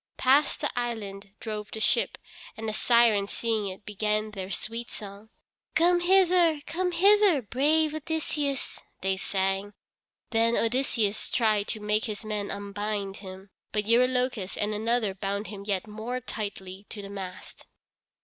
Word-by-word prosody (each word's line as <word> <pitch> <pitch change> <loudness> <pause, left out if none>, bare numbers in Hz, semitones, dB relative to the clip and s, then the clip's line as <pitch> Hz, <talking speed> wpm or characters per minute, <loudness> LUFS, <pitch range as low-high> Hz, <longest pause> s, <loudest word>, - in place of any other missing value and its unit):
Past 275 +5 +3
the 295 - 0
island 210 -5 -4
drove 210 -2 -5
the 220 - -6
ship, - - +1 0.4
and 225 0 -4
the 215 - -1
Sirens 225 -4 +4
seeing 225 -3 -1
it 190 +1 -8
began 215 +1 0
their 190 -2 -6
sweet 230 +5 -4
song. 205 +1 -8 0.5
"Come 350 +2 +5
hither, 350 -3 +4
come 360 +4 -1
hither, 390 -4 +5
brave 300 +7 +2
Odysseus," 300 -3 -2 0.2
they 190 0 +1
sang. 195 +1 -1 0.6
Then 230 0 +3
Odysseus 230 -3 +1
tried 215 -3 +2
to 220 - -3
make 210 +2 0
his 215 -1 -5
men 210 -2 -2
unbind 200 0 -3
him, 190 0 -10 0.2
but 210 -1 0
Eurylochus 250 -3 +2
and 210 +1 0
another 220 -1 +1
bound 200 +2 -3
him 200 -1 -8
yet 195 -3 0
more 220 +4 -4
tightly 200 -5 -6
to 205 -2 -7
the 195 - -8
mast. 190 -2 -8
215 Hz, 145 wpm, -28 LUFS, 200-255 Hz, 0.6 s, Come